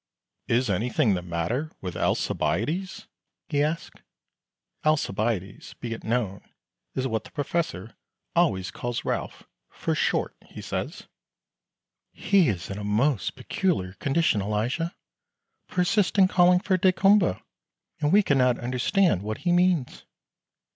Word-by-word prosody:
"Is 125 Hz, +2 st, +2 dB
anything 105 Hz, +1 st, +1 dB
the 90 Hz, -, -1 dB
matter 90 Hz, -, -2 dB
with 90 Hz, -2 st, -6 dB
Alcibiades?" 160 Hz, -, -1 dB, 0.4 s
he 145 Hz, -2 st, +1 dB
asks. 155 Hz, +3 st, -2 dB, 0.8 s
Alcibiades, 110 Hz, -, -1 dB
be 120 Hz, -2 st, -5 dB
it 115 Hz, -, -8 dB
known, 110 Hz, -4 st, -1 dB, 0.5 s
is 130 Hz, 0 st, 0 dB
what 110 Hz, -3 st, -2 dB
the -, -, -13 dB
Professor 160 Hz, -5 st, -3 dB, 0.4 s
always 95 Hz, -1 st, +2 dB
calls 120 Hz, -1 st, -4 dB
Ralph -, -, -3 dB, 0.3 s
"for -, -, -2 dB
short," -, -, 0 dB
he -, -, -11 dB
says. -, -, -4 dB, 1.1 s
"He 185 Hz, -5 st, +3 dB
is 95 Hz, -2 st, -3 dB
in 100 Hz, -, -5 dB
a -, -, -5 dB
most 110 Hz, +2 st, +1 dB
peculiar 130 Hz, -, -1 dB
condition, 135 Hz, -, +1 dB
Elijah 115 Hz, -, -1 dB, 0.7 s
persists 185 Hz, +3 st, +1 dB
in 190 Hz, -1 st, +7 dB
calling 180 Hz, -1 st, +4 dB
for 185 Hz, -2 st, +1 dB
daykumboa, 190 Hz, -, +3 dB, 0.6 s
and 150 Hz, -1 st, +1 dB
we 205 Hz, +2 st, +6 dB
can 140 Hz, -7 st, +2 dB
not 125 Hz, -1 st, +3 dB
understand 125 Hz, -, +1 dB
what 110 Hz, +1 st, -4 dB
he 175 Hz, -, +3 dB
means." 175 Hz, -6 st, +1 dB
130 Hz, 125 wpm, -26 LUFS, 105-175 Hz, 1.1 s, in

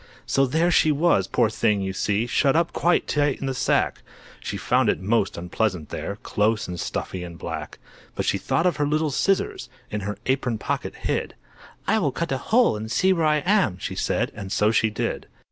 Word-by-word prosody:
So 135 Hz, 0 st, +2 dB
there 165 Hz, +6 st, +2 dB
she 155 Hz, -2 st, +4 dB
was, 145 Hz, -, +2 dB
poor 120 Hz, -2 st, +2 dB
thing, 110 Hz, -2 st, +1 dB
you 95 Hz, 0 st, -2 dB
see, 105 Hz, +3 st, 0 dB
Shut 135 Hz, +3 st, +2 dB
up 170 Hz, +1 st, +1 dB
quite 175 Hz, +1 st, +2 dB
tight 145 Hz, -2 st, +1 dB
in -, -, -4 dB
the 135 Hz, -, -1 dB
sack; -, -, +1 dB, 0.4 s
She -, -, -5 dB
found -, -, +2 dB
it -, -, +1 dB
most 100 Hz, +1 st, 0 dB
unpleasant 90 Hz, -2 st, -2 dB
there, 100 Hz, -, -4 dB
Close 105 Hz, +1 st, 0 dB
and 90 Hz, -1 st, -5 dB
stuffy 90 Hz, +2 st, -4 dB
and 85 Hz, -1 st, -8 dB
black. -, -, -6 dB, 0.4 s
But -, -, -2 dB
she -, -, +1 dB
thought 165 Hz, -, 0 dB
of 175 Hz, -4 st, +2 dB
her 145 Hz, -1 st, +1 dB
little 155 Hz, +1 st, +1 dB
scissors, 185 Hz, -7 st, 0 dB, 0.2 s
In 105 Hz, -, -2 dB
her 105 Hz, 0 st, -4 dB
apron 130 Hz, -3 st, 0 dB
pocket -, -, -3 dB
hid. -, -, -2 dB, 0.5 s
"I 220 Hz, -, +2 dB
will 145 Hz, -8 st, +1 dB
cut 165 Hz, +4 st, -3 dB
a 135 Hz, -, 0 dB
hole 235 Hz, -, +4 dB
and 110 Hz, +1 st, -5 dB
see 190 Hz, +7 st, +3 dB
where 165 Hz, -3 st, +1 dB
I 150 Hz, -1 st, +2 dB
am," 180 Hz, -, +2 dB
She -, -, -5 dB
said. -, -, -1 dB
And 100 Hz, -2 st, -7 dB
so 105 Hz, +2 st, +3 dB
she 110 Hz, 0 st, +2 dB
did. 105 Hz, -, -3 dB
125 Hz, 210 wpm, -24 LUFS, 105-155 Hz, 0.5 s, she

